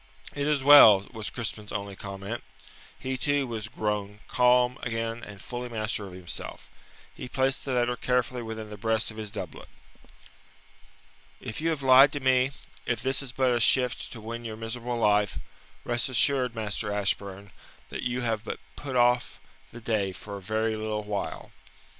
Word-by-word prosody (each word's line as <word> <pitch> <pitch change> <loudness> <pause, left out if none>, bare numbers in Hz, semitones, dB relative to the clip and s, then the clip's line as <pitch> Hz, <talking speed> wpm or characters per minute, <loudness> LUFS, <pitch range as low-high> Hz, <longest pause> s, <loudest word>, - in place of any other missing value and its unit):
"It 145 0 -1
is 150 -3 +1
well," 110 -9 +9
was 110 -2 -4
Crispin's 105 -3 -5
only 100 -1 -4
comment. 100 +4 -6 0.6
He, 130 0 -3
too, 145 +1 +1
was 115 -3 -4
grown 105 -3 -3
calm 125 0 +3
again 115 0 -3
and 100 -2 -10
fully 125 +2 -6
master 110 -2 -3
of 95 - -11
himself. 90 -3 -6 0.4
He 125 - -8
placed 135 0 0
the 135 - -2
letter 120 0 +1
carefully 125 0 0
within 110 -2 -6
the 105 - -7
breast 110 +1 0
of 110 - -12
his 110 -1 -4
doublet. 105 0 -7 1.7
"If 110 - -6
you 165 - +1
have 155 -4 -2
lied 135 +2 +8
to 145 - -2
me, 130 -1 +3 0.4
if 120 -2 -1
this 135 +1 +1
is 135 -3 -7
but 130 -1 +2
a 120 - +1
shift 125 +1 +2
to 115 - -8
win 115 +2 -6
your 110 -2 -6
miserable 120 +2 -4
life, 105 - +2 0.5
rest 120 +2 -1
assured, 130 -1 +2
Master 105 -1 -2
Ashburn, 100 -1 -2 0.4
that - - -5
you 125 0 -1
have 110 -3 -1
but - - -4 0.2
put 135 -3 -6
off 120 0 +3 0.3
the 120 - -10
day 105 -4 0
for 100 +2 -8
a 100 - -7
very 110 +3 0
little 110 0 -3
while." 105 -1 -4
115 Hz, 170 wpm, -27 LUFS, 105-125 Hz, 1.7 s, well